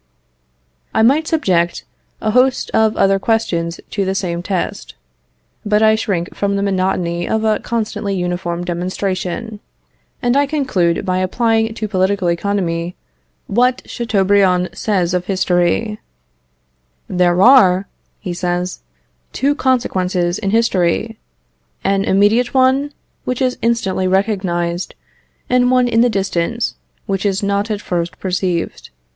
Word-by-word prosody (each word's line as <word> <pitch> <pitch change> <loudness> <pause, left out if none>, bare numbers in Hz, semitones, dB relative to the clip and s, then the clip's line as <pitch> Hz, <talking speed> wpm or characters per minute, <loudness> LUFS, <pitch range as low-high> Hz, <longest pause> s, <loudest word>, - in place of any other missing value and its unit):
I 220 - +4
might 290 +7 +3
subject 180 - 0 0.4
a 215 - 0
host 255 +2 +2
of 220 -1 +2
other 195 0 +3
questions 175 -7 -1
to 200 - -1
the 190 0 -1
same 175 -3 -2
test; 185 0 -4 0.7
but 210 +1 +2
I 220 0 +6
shrink 195 -6 -2
from 200 0 -1
the 200 - -1
monotony 185 -3 -1
of 220 0 0
a 215 -1 +2
constantly 215 -3 -3
uniform 175 -1 -2
demonstration, 185 +4 -3 0.6
and 245 0 +1
I 285 0 +3
conclude 235 - 0
by 185 0 0
applying 225 +3 +1
to 215 - -3
political 190 -2 +1
economy 170 -2 -2 0.5
what 250 +4 +1
Chateaubriand 195 -5 +1
says 185 -5 0
of 180 0 -1
history: 190 +3 0 1.1
"There 180 -1 +2
are," 200 -7 +6 0.3
he 180 - -5
says, 175 0 -2 0.5
"two 280 +3 +1
consequences 185 - 0
in 200 - -2
history; 215 0 +1 0.6
an 195 0 +1
immediate 215 +6 +2
one, 265 +2 +3 0.3
which 250 -1 -2
is 255 -1 0
instantly 195 -5 0
recognized, 185 -3 -1 0.5
and 250 0 +3
one 250 -1 +3
in 230 -1 +3
the 245 - +4
distance, 195 +2 -1 0.3
which 195 -3 -2
is 200 0 0
not 200 +2 0
at 210 -1 -2
first 175 -1 -3
perceived. 180 -2 -2
195 Hz, 130 wpm, -17 LUFS, 180-225 Hz, 1.1 s, I